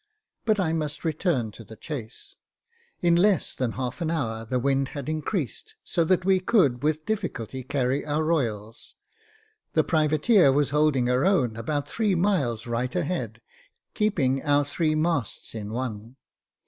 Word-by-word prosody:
But 215 -2 +2
I 165 -4 +1
must 155 0 -3
return 155 - 0
to 115 - -12
the 110 +1 -12
chase. 125 -4 -8 0.7
In 170 -1 +4
less 190 0 +3
than 125 -3 -2
an 130 +6 -2
hour 115 -9 -2
the 125 +3 -1
wind 135 +1 +1
had 140 - -5
increased, 155 - -3
so 170 - 0
that 185 +1 +2
we 190 -1 +4
could 170 - +2
with 155 +1 0
difficulty 170 - -3
carry 130 +1 -1
our 150 +1 -1
royals; 115 -9 -2 0.8
the - - +3
privateer 155 - +4
was 140 0 +1
holding 150 -4 +2
her 125 +2 +2
own 150 - +2
about 145 +6 -2
three 215 -4 0
miles 160 - +1
right 120 +3 -2
a 180 - +1
head, 180 +4 -4 0.5
keeping 145 - +1
our 145 0 +2
three 155 +2 0
masts 155 -7 -1
in 105 -2 -5
one. 115 -1 -5
145 Hz, 155 wpm, -26 LUFS, 125-170 Hz, 0.8 s, In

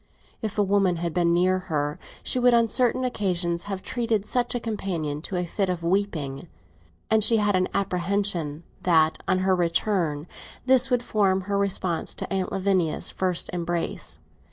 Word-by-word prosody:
If 215 -3 -4
a 205 - +4
woman 195 -2 +2
had 170 -1 -3
been 170 0 +2
near 185 +2 +3
her 145 -1 -1 0.2
she 255 - +2
would 245 -1 +5
on 230 -1 +3
certain 250 +2 +2
occasions 175 -8 -1
have 195 -2 -5
treated 230 -4 -1
such 245 +2 0
a - - 0
companion 175 -10 -3
to 185 - -6
a 180 0 -1
fit 190 +3 -1
of 175 -2 -2
weeping; 170 -7 -1 0.6
and 220 -1 +5
she 225 +1 +6
had 205 -2 +2
an 185 0 +2
apprehension 180 -4 -1 0.2
that, 160 -3 +3
on - - +2
her 190 -1 +4
return, 170 -3 0 0.4
this 260 0 +5
would 245 -2 +1
form 195 -4 +1
her 200 +2 -3
response 190 -4 -1
to - - -4
Aunt 190 -1 -1
Lavinia's 185 -4 0
first 185 -2 -1
embrace. 175 -1 -3
190 Hz, 170 wpm, -25 LUFS, 170-210 Hz, 0.6 s, she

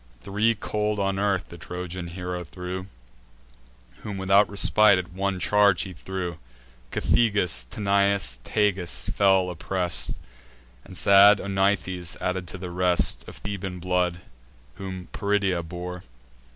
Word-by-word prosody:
Three 105 +4 +1
cold 105 0 -2
on 100 -1 0
earth 100 -2 0
the 85 - -11
Trojan 90 +1 -6
hero 90 0 -5
threw, 90 +2 -6 1.1
Whom 105 -2 -6
without 95 +2 +4
respite 100 0 +4
at 90 0 -5
one 95 0 -1
charge 100 0 +3
he 95 - -7
slew: 90 -3 -5 0.5
Cethegus, 100 - +1
Tanais, 100 - +1
Tagus, 100 -5 0
fell 95 -2 +3
oppress'd, 90 0 -1 0.7
And 95 -2 -9
sad 100 +1 +7
Onythes, 95 -3 -1
added 90 -1 -2
to 95 - -7
the 90 -1 -7
rest, 90 0 +2
Of - - -10
Theban 95 -2 -5
blood, 90 -1 0 0.6
whom 95 -2 -7
Peridia 100 -3 0
bore. 90 +2 -7
95 Hz, 125 wpm, -25 LUFS, 90-100 Hz, 1.1 s, sad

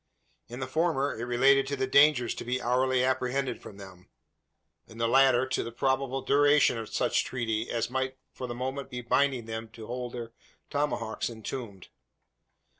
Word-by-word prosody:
In 120 +2 -8
the - - -1
former 145 0 0
it 115 - -4
related 135 +3 +4
to 140 - -2
the 130 -1 -1
dangers 140 -2 +4
to - - -7
be 125 +2 -1
hourly 125 +1 +1
apprehended 130 0 -1
from 100 - -11
them; 95 -2 -13 0.8
in 110 - -14
the 115 0 +1
latter, 130 0 +5
to 130 - 0
the 115 - -6
probable 135 +2 -1
duration 145 -1 +4
of 110 - -6
such - - +1
treaty 115 -3 -2
as 115 0 -2
might 130 0 -2 0.2
for 125 - -6
the 120 - -5
moment 130 +2 -4
be 125 0 -5
binding 130 0 +1
them 110 0 -6
to 110 - -9
hold 125 +1 -5
their 120 -2 -6 0.4
tomahawks 140 -8 -1
entombed. 110 -3 -7
125 Hz, 175 wpm, -28 LUFS, 115-135 Hz, 0.8 s, latter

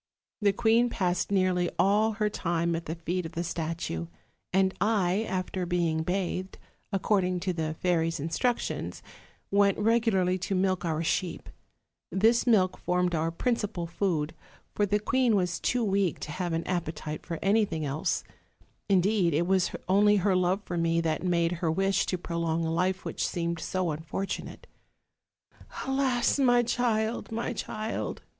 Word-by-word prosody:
The 205 -1 +4
queen 230 +4 +3
passed 180 -5 0
nearly 185 -2 +2
all 210 +3 +3
her 210 0 0
time 170 -4 -1
at 165 - -5
the 160 - -3
feet 175 +2 -2
of 165 - -14
the 170 - -2
statue; 165 - -3 0.4
and 190 0 +3
I, 205 0 +2
after 185 -1 -2
being 170 -3 +1
bathed, 185 +2 -2 0.3
according 185 -2 +1
to 185 0 -1
the 160 -2 -2
fairies' 165 -2 0
instructions, 165 - -2 0.5
went 200 -1 +4
regularly 210 -5 +2
to 190 +2 -2
milk 185 -1 +1
our 160 -1 -1
sheep: 170 +1 -2 0.6
this 225 +7 +3
milk 190 -6 +3
formed 180 0 0
our 165 0 +1
principal 205 -1 -1
food, 165 -3 -1 0.4
for 205 - +1
the 205 +2 +2
queen 245 +1 +2
was 180 -3 0
too 245 -1 0
weak 195 -4 +1
to 150 - -5
have 175 +2 -3
an 165 0 -1
appetite 160 -4 -3
for 170 -2 -4
anything 195 -6 +2
else; 140 +2 -1 0.7
indeed, 190 -3 +3
it 170 +3 +2
was 185 0 +2 0.2
only 205 +2 +5
her 195 -1 +2
love 185 +2 +1
for 175 -1 -3
me 165 0 +2
that 160 -2 0
made 170 -2 +1
her 165 - +1
wish 195 +3 +1
to 185 - -1
prolong 170 -1 -1
a 160 - -1
life 185 +2 0
which - - -1
seemed 170 -1 -2
so 185 0 -1
unfortunate. 160 +6 -5 1.2
'Alas, 265 -1 +1
my 245 -3 +4
child, 230 -2 0
my 230 +2 -2
child!' 215 -1 -4
185 Hz, 155 wpm, -28 LUFS, 170-205 Hz, 1.2 s, only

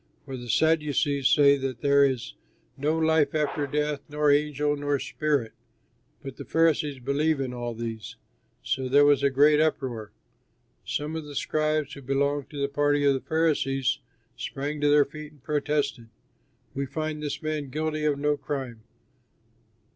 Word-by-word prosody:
For 135 -2 -6
the 120 -1 -8
Sadducees 145 -1 +2
say 140 -1 +5
that 130 -3 -4
there 140 0 +5
is 130 - 0 0.4
no 150 +4 0
life 160 -2 +2
after 150 -1 0
death, 150 0 -1
nor 150 0 +2
angel, 145 0 +1
nor 145 0 0
spirit; 140 -5 -1 0.7
but 135 -2 -8
the - - -7
Pharisees 155 -3 +1
believe 140 +4 0
in 130 -2 -3
all 120 -1 -4
these; 115 -1 -6 0.5
so 130 -1 -2
there 145 +2 +6
was 145 -2 +4
a 140 - +3
great 145 +3 +4
uproar. 130 -9 -1 0.7
Some 150 +2 -3
of 160 -2 -4
the 145 -1 -9
scribes 155 0 0
who 140 - -9
belonged 140 +1 -1
to 145 - -7
the 140 - +1
party 145 0 +1
of 140 - +5
the 135 - -2
Pharisees 140 -4 0 0.4
sprang 145 +2 -4
to 145 - +3
their 145 -1 +5
feet 155 +1 -10
and 145 -4 -24
protested, 145 -5 -1 0.6
"We 140 0 -3
find 155 +2 -4
this 150 +1 -4
man 155 -3 -3
guilty 155 +2 -2
of 145 -2 +2
no 145 +1 +1
crime. 130 -7 -5
145 Hz, 160 wpm, -26 LUFS, 135-150 Hz, 0.7 s, there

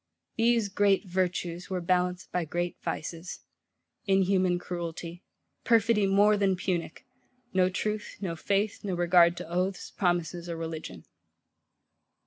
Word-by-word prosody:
These 230 -2 +2
great 200 0 +2
Virtues 180 -1 -2
were 185 -1 -1
balanced 180 +1 0
by 180 - 0
great 175 +2 -2
Vices; 165 +3 -5 0.7
inhuman 190 -2 +3
cruelty; 175 -1 -6 0.4
perfidy 225 -3 +3
more 205 +2 +5
than 195 -2 +2
punic; 175 -3 -3 0.5
no 185 -1 +3
truth, 210 +3 -3
no 180 -4 -3
faith, 200 +5 -1
no 195 -3 -2
regard 175 0 +5
to - - -6
oaths, 180 +3 -2
promises, 175 -2 -1
or 165 - -3
religion. 165 -1 -6
180 Hz, 120 wpm, -28 LUFS, 175-195 Hz, 0.7 s, more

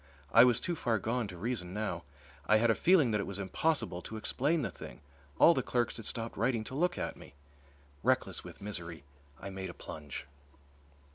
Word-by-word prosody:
I 115 - +9
was 120 -3 +4
too 175 - -1
far 120 -7 +1
gone 115 +3 -1
to 90 -2 -9
reason 95 -3 -3
now. 95 -7 -3 0.4
I 110 - +6
had 115 +1 +4
a - - +4
feeling 160 -4 +4
that 105 -1 +1
it - - -5
was 100 - -5
impossible 100 - 0
to 110 - -7
explain 145 +8 0
the - - -2
thing. - - -10 0.4
All 170 - +8
the 130 - +1
clerks 120 -2 0
had 115 - -6
stopped 115 -1 -4
writing 115 0 +1
to 120 - -8
look 175 +5 +1
at - - -3
me. - - -14 0.7
Reckless - - +1
with - - -11
misery, 85 -7 -5 0.4
I 100 - -6
made 95 -1 -5
a 85 - -9
plunge. 75 -4 -7
110 Hz, 200 wpm, -32 LUFS, 95-125 Hz, 0.7 s, I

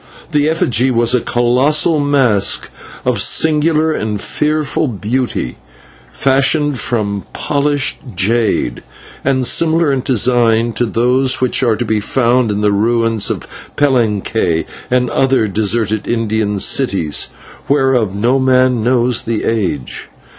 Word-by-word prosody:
That 150 -1 +2
effigy 135 -5 +1
was 120 -1 +2
a 125 - +2
colossal 130 +8 +1
mask 135 -8 +1 0.3
of - - +1
singular 160 0 +2
and 110 -7 -3
fearful 150 +4 -1
beauty, 120 - -3 0.5
fashioned 140 +1 +1
from 100 -5 -2
polished 145 -1 -1 0.2
jade, 105 - 0 0.4
and 130 -1 +1
similar 165 +3 +2
in 130 - -1
design 120 -2 +1
to 120 +3 -1
those 125 +3 +1
which 130 0 +1
are 120 -4 +2
to 120 - -3
be 110 -1 0
found 120 +2 +1
in 105 0 -2
the 105 0 +2
ruins 115 +1 +1
of - - -4 0.3
Palenque 110 - 0 0.2
and 125 -1 +1
other 135 -4 +2
deserted 110 +1 -1
Indian 110 -3 -1
cities, 95 - 0 0.4
whereof 130 -8 +1
no 120 +6 +1
man 130 -2 +2
knows 120 0 +1
the 115 -1 -3
age. 95 - -3
120 Hz, 125 wpm, -15 LUFS, 110-135 Hz, 0.5 s, That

